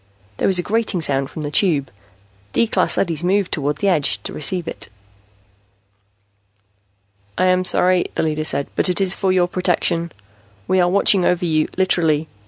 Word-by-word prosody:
There - - 0
was 190 - +5
a 175 - 0
grating 220 -3 -1
sound 135 -3 0
from 155 - -7
the 145 - -4
Tube. 150 -5 +1 0.6
D - - +3
class 225 - +1
leadys 165 -3 -1
moved 190 +1 0
toward 145 -1 -1
the 200 - -1
edge 145 - +2
to - - -5
receive 175 +3 -1
it. 110 +1 -5 2.5
"I - - +2
am 185 0 +2
sorry," 180 0 +2
the - - 0
leader 155 -1 -1
said, 140 -2 0
"but - - +1
it 180 - +2
is 190 -2 +1
for 190 -1 -1
your 180 -1 +2
protection. 175 -2 -1 0.6
We 185 - +2
are 175 -1 +3
watching 195 0 +3
over 180 0 +1
you, 155 -2 +1
literally. 160 -5 +1
175 Hz, 175 wpm, -19 LUFS, 155-185 Hz, 2.5 s, was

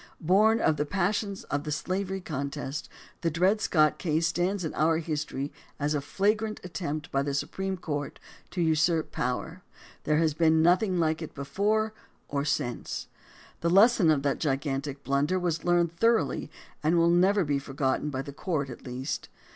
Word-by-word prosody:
Born 210 +7 +4
of 155 - +2
the 150 - 0
passions 200 +2 -1
of 145 0 -2
the 150 - -4
slavery 190 +5 -2
contest, 140 -2 -4 0.3
the 170 - +1
Dred 185 +7 +2
Scott 155 -6 +3
case 160 -1 +1
stands 175 +3 0
in 155 - -3
our 160 +1 +2
history 150 -3 -3 0.3
as 145 +1 0
a 145 - 0
flagrant 210 +7 0
attempt 165 -3 -4
by 135 - +1
the 140 0 -2
Su 140 - 0
preme 190 -1 -4
Court 145 -4 -4 0.3
to 180 - -3
usurp 160 +1 +2
power. 145 +8 -3 0.4
There 150 - +2
has 160 -1 +2
been 160 0 +3
noth 175 +4 +5
ing 185 -5 0
like 160 0 +1
it 160 - -7
before 210 +9 0 0.3
or 140 -1 -1
since. 140 -4 -2 0.5
The 170 - 0
lesson 200 -1 +6
of 145 -3 +3
that 140 -1 0
gigantic 140 -1 -2
blunder 140 +6 +1
was 170 -3 -1
learned 175 -1 +2
thoroughly 230 +4 +2 0.3
and 160 +2 +2
will 170 0 +4
never 190 +3 +4
be 145 -1 +1
for 135 0 -10
gotten 135 +2 0
by 135 -2 -3
the 140 - -8
court 145 -4 -2
at - - -10
least. 125 +2 -4
160 Hz, 180 wpm, -28 LUFS, 145-185 Hz, 0.5 s, lesson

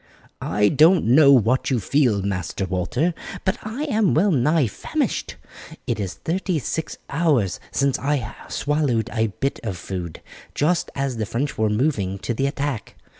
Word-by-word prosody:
"I 105 0 +2
don't 160 +5 +5
know 140 +5 +6
what 125 0 +3
you 130 -3 +1
feel, 115 -3 +2
Master 95 -1 -2
Walter, 95 - 0 0.3
but 190 - 0
I 225 +7 -4
am 220 - +2
well 190 +6 +3
nigh 150 +1 +3
famished. 105 - -2 0.5
It - - -2
is 95 -3 -3
thirty 180 +1 -2
six 160 +3 -3
hours 140 - +1
since 140 -1 +1
I 135 -5 -1
swallowed 145 -6 0
a 115 -1 +1
bit 135 +7 -3
of 100 -6 -4
food, 85 -2 -6 0.3
just 165 +3 +1
as 135 -3 -2
the 110 -2 -2
French 125 +6 -2
were 110 0 +1
moving 105 -5 0
to 120 - -3
the 135 +4 0
attack. 140 -4 -3
135 Hz, 160 wpm, -22 LUFS, 105-155 Hz, 0.5 s, know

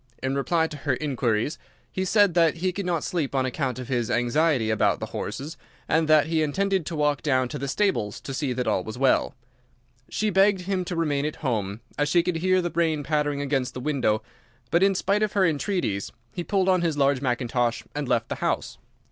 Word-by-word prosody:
In 130 0 0
reply 160 +4 +1
to 155 -2 -6
her 145 -2 -1
inquiries, 130 -1 -1 0.3
he 190 - -2
said 205 -1 +4
that 165 -3 +4
he 185 +3 -1
could 200 0 -4
not 170 -4 0
sleep 150 -6 -2
on 130 -1 +2
account 130 -1 -2
of 125 -2 -6
his 120 -4 -1
anxiety 120 0 +2
about 110 - +2
the - - -3
horses, 150 +5 -5 0.3
and 160 0 +2
that 155 -2 +5
he 160 0 0
intended 190 +3 0
to 165 - -3
walk 150 -2 +1
down 130 -4 +1
to 145 - -5
the 140 - -3
stables 140 - 0
to 135 - -6
see 135 -1 -1
that 125 0 -2
all 90 - +1
was 110 +4 -7
well. 130 0 +2 0.7
She 215 0 0
begged 195 0 +4
him 185 0 -1
to 175 - -4
remain 150 -4 0
at 155 - -5
home, 105 -4 -1 0.2
as 145 -1 +2
she 175 +1 +4
could 175 -1 -1
hear 185 +2 +2
the 175 - -2
rain 160 -3 0
pattering 145 -1 0
against 135 -3 -1
the - - -4
window, 125 -6 0 0.5
but 170 - +3
in 195 0 +4
spite 200 +3 +1
of 215 -2 0
her 195 -2 +3
entreaties 155 - -1 0.2
he 175 - -4
pulled 190 +1 +1
on 185 -2 +3
his 165 -4 0
large 140 -2 +2
mackintosh 120 -2 0
and 145 -3 -3
left 115 -3 +1
the - - -2
house. - - -2
150 Hz, 215 wpm, -25 LUFS, 130-175 Hz, 0.7 s, that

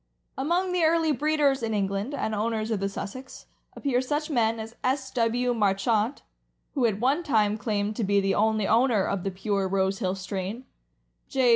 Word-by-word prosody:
Among 345 +7 0
the 360 -2 +1
early 320 0 +3
breeders 290 -1 +2
(in 225 -2 -1
England) 200 +6 -1
and 220 - -2
owners 220 +1 -1
of 215 - 0
the 195 +1 -1
Sussex, 230 +7 -7 0.3
appear 255 -3 0
such 295 +4 -2
men 230 -4 +1
as 220 +1 -7
S. 265 +1 0
W. 245 +1 +1
Marchant, 215 +3 +1 0.5
who 260 -5 +2
at 205 -2 -2
one 270 +8 +2
time 215 -10 +2
claimed 210 -1 -2
to 230 - 0
be 200 0 +3
the 195 0 +1
only 215 -1 +2
owner 230 -3 +3
of 200 -3 -2
the 195 - -1
pure 195 +1 -1
Rose 190 0 0
hill 185 0 -1
strain; 195 +5 -5 0.6
J. 260 -2 +2
225 Hz, 180 wpm, -26 LUFS, 200-265 Hz, 0.6 s, early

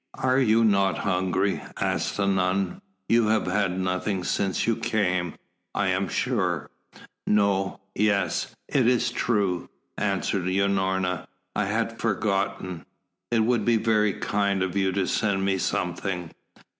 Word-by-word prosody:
"Are 130 0 +2
you 115 -3 +4
not 100 -4 +3
hungry?" 95 +1 0 0.2
asked - - -1
the 100 - +1
nun. 95 -1 0 0.3
"You 115 -1 +4
have 110 -1 +2
had 95 -1 0
nothing 95 +1 -1
since 95 +1 0
you 115 - +2
came, 100 -7 0 0.4
I 100 -2 +1
am 95 +1 0
sure." - - -1 0.6
"No 100 -2 +1
yes 100 -2 0
it 130 -4 +2
is 120 -1 +2
true," 100 -8 0 0.3
answered 100 -2 0
Unorna. 95 -2 0 0.3
"I 105 - +1
had 115 +3 -2
forgotten. 100 -5 -1 0.5
It 115 -1 +2
would 115 0 +2
be 115 +1 +3
very 105 -2 +2
kind 100 -1 0
of 95 0 -3
you 95 -1 +2
to 95 0 0
send 95 0 0
me 95 -1 +1
something." 90 -2 -2
100 Hz, 135 wpm, -26 LUFS, 95-105 Hz, 0.6 s, you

